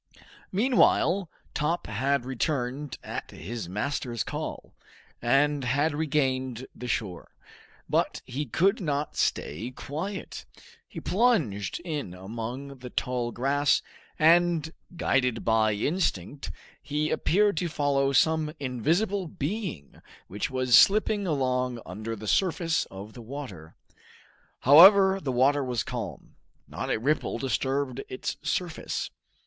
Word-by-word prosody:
Meanwhile 195 -5 +3 0.2
Top 150 +4 -1
had 125 +4 0
returned 130 +1 -2
at - - -5
his 105 +2 -6
master's 120 +1 -2
call, - - -6 0.5
and 140 +3 +2
had 145 +5 +1
regained 130 -5 -1
the 125 - -7
shore: 95 -7 -4 0.5
but - - 0
he 135 +3 -4
could 195 +7 +2
not 150 -3 -2
stay 105 +12 -1
quiet; 160 +10 -6 0.4
he - - -8
plunged 170 - +1
in 150 - -4
among 120 +8 -6
the 125 0 -8
tall 125 -1 -2
grass, 140 +4 +2 0.3
and 165 0 +4 0.2
guided 125 -7 +1
by 110 -1 +3
instinct, 140 - -1 0.3
he 150 +1 -1
appeared 205 +2 +2
to 170 +1 0
follow 140 -2 +1
some 155 +2 +3
invisible 170 - 0
being 155 - -5 0.3
which 100 +7 -3
was 130 -2 +3
slipping 205 0 +5
along 125 -5 0
under 110 +5 -5
the 110 0 -9
surface 165 - +1
of 100 +3 -10
the 120 - -10
water. 110 - -8 0.9
However 190 +7 +8
the 135 - -2
water 135 +3 +3
was 125 -4 -1
calm; - - -6 0.3
not - - -5
a - - +1
ripple 140 +7 0
disturbed 135 0 -1
its 130 - -4
surface. 175 -3 -3
140 Hz, 120 wpm, -27 LUFS, 120-160 Hz, 0.9 s, However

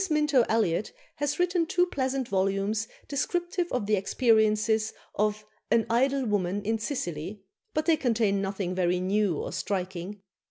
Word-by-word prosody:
Minto 300 -4 +3
Elliot 215 -4 +1 0.2
has 290 -1 -1
written 355 -2 +1
two 355 +2 +3
pleasant 265 -5 -2
volumes 195 +2 0 0.2
descriptive 350 +5 -1
of 250 -5 -1
the 210 +1 +3
experiences 220 0 +2 0.2
of 210 0 0 0.2
"An 230 -1 +3
Idle 265 +3 +2
Woman 205 -2 0
in 225 +2 0
Sicily," 195 - -4 0.3
but 310 0 +1
they 320 -1 +4
contain 220 -7 +1
nothing 195 -2 -2
very 180 -1 +1
new 190 -2 +1
or - - -4
striking. 190 +1 -4
215 Hz, 145 wpm, -28 LUFS, 195-270 Hz, 0.3 s, they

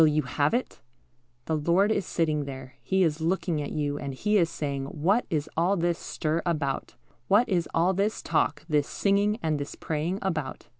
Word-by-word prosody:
Will 160 - +8
you 150 0 +2
have 145 - +1
it? 250 - -3 0.6
The 160 - 0
Lord 170 +7 +3
is 200 -3 0
sitting 155 -3 0
there; 130 -2 -8
He 190 0 +2
is 160 -2 0
looking 170 -2 0
at 145 - -4
you, 145 -1 -1
and 140 -2 -5
He 210 +9 0
is 170 -2 +2
saying, 140 -4 -3
"What 170 - +1
is 150 -2 -1
all 180 +5 +2
this 170 0 0
stir 160 +2 -2
about? 150 -5 -2 0.3
What 215 +5 +4
is 175 -5 0
all 175 +3 +2
this 200 +3 -1
talk, 150 -2 0
this 150 -3 +2
singing, 205 +1 +1
and 155 -2 0
this 145 - -5
praying 160 +4 -2
about? 160 -8 -3
160 Hz, 195 wpm, -27 LUFS, 145-190 Hz, 0.6 s, Will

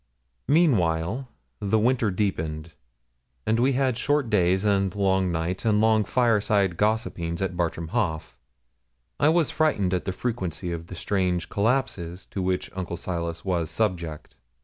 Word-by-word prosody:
Meanwhile, 115 - +2 0.3
the 105 +1 +1
winter 115 0 +2
deepened, 80 -5 -2 0.7
and 110 +1 +2
we 130 +3 +3
had 130 -2 +1
short 145 -4 +1
days 95 0 +3
and 100 -2 +1
long 95 -2 +2
nights, 85 +2 -2
and 105 -2 +3
long 110 -1 +3
fireside 105 -4 +2
gossipings 105 -5 -1
at 95 -2 -2
Bartram 85 -1 -2
Haugh. 80 - -1 0.9
I 145 - +5
was 165 -2 +2
frightened 105 - +1
at 90 - -1
the 95 - -1
frequency 95 -5 -3
of 85 0 -5
the 90 - -8
strange 90 -2 -1
collapses 100 -6 -1
to 95 - -3
which 90 0 -1
Uncle 90 -2 -4
Silas 85 -1 -4
was 85 -4 0
subject. 85 -8 -2
95 Hz, 145 wpm, -25 LUFS, 85-110 Hz, 0.9 s, I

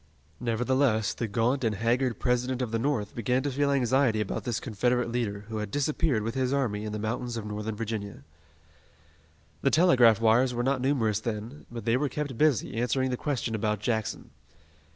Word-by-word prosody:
Nevertheless, 115 -2 +1
the 115 - -3
gaunt 120 +6 0
and 110 -2 +1
haggard 115 +2 +1
President 125 +1 0
of 115 - -4
the 115 - 0
North 115 -5 -1
began 125 +3 0
to 145 - -1
feel 140 +2 +1
anxiety 130 -3 +2
about 105 - -3
this 120 -3 -1
Confederate 120 +1 0
leader 110 -4 -2
who 110 +1 -6
had 105 -1 -3
disappeared 145 - 0
with 115 +1 -2
his 130 -1 0
army 115 -7 0
in 105 - -4
the 105 - -3
mountains 115 +3 -3
of 110 - -5
Northern 105 +1 -4
Virginia. 105 -2 -5 1.4
The - - +3
telegraph 125 - +5
wires 120 +3 +3
were 120 - 0
not 135 0 +1
numerous 120 -6 +1
then, 115 +5 -6
but 115 -2 -7
they 115 +1 +3
were 145 +1 0
kept 145 -3 -4
busy 135 -5 +1
answering 125 +2 0
the - - 0
question 125 -4 -2
about 105 -1 0
Jackson. 110 0 -2
120 Hz, 185 wpm, -28 LUFS, 110-130 Hz, 1.4 s, telegraph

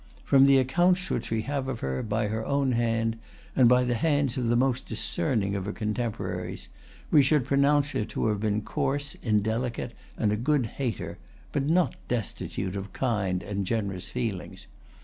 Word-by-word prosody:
From 135 0 +6
the 140 -1 +6
accounts 175 +8 +2
which - - -2
we 110 -1 0
have 140 0 -2
of 130 -4 -4
her, 65 -1 -2
by 110 0 -1
her 110 +1 -2
own 140 +1 +1
hand, 115 -1 0 0.4
and 125 -3 +6
by 125 0 +5
the 125 0 0
hands 145 0 +1
of 125 -3 -1
the 120 - +3
most 125 0 +1
discerning 100 +2 -1
of 95 -2 -3
her 105 - -2
contemporaries, 110 +2 -3 0.4
we 150 - +7
should 140 -1 +3
pronounce 140 +1 +3
her - - 0
to 110 - -3
have 105 -1 0
been 105 0 0
coarse, 145 +5 -2
indelicate, 115 +2 0 0.3
and 105 - +1
a - - +2
good 135 +2 +1
hater, 115 -1 -4 0.3
but 140 -1 0
not 175 +1 +3
destitute 100 -5 -3
of 100 0 -6
kind 95 -8 0
and 100 0 -2
generous 100 -5 -2
feelings. 115 -7 -4
120 Hz, 175 wpm, -27 LUFS, 105-135 Hz, 0.4 s, we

